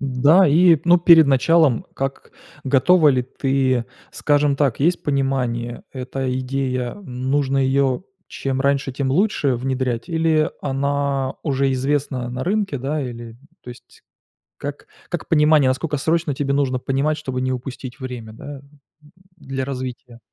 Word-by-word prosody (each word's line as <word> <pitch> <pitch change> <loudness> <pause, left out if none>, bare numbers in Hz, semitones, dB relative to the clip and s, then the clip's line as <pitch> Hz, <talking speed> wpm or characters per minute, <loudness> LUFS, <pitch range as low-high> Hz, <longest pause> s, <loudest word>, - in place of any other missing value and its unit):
Да, 140 +8 +4
и 165 +2 +5
ну 175 +1 +5
перед 165 -2 +7
началом, 140 0 +3
как 135 0 -5 0.3
готова 150 +5 +4
ли 130 -3 +2
ты 130 -1 0 0.3
Скажем 145 -1 +1
так, 135 -3 0
есть 175 +4 +1
понимание: 130 -4 -2
эта 130 0 -4
идея- 130 -1 -2
нужно 135 +1 -1
ее 135 +3 +1 0.2
чем 135 -1 -3
раньше, 140 -1 0
тем 130 0 -2
лучше 150 -4 +1
внедрять 130 -2 -2
или 160 -2 +1
она 140 -1 -1
уже 135 -3 0
известна 130 -2 -1
на 125 +1 -4
рынке, 195 -6 -1
да? 140 +4 -2
Или 120 -2 -8 0.3
то - - -13
есть 120 - -16 0.6
Как - - -7 0.2
как - - -4
понимание, 150 -3 +4
насколько 150 +4 -2
срочно 160 0 0
тебе 140 0 -1
нужно 135 -2 0
понимать, 140 +4 -1
чтобы 130 -4 -4
не 130 0 -1
упустить 130 +1 -7
время, 125 -4 -7
да, 140 +5 -10 0.7
для 135 -4 -5
развития? 130 -2 -7
135 Hz, 140 wpm, -21 LUFS, 130-145 Hz, 0.7 s, перед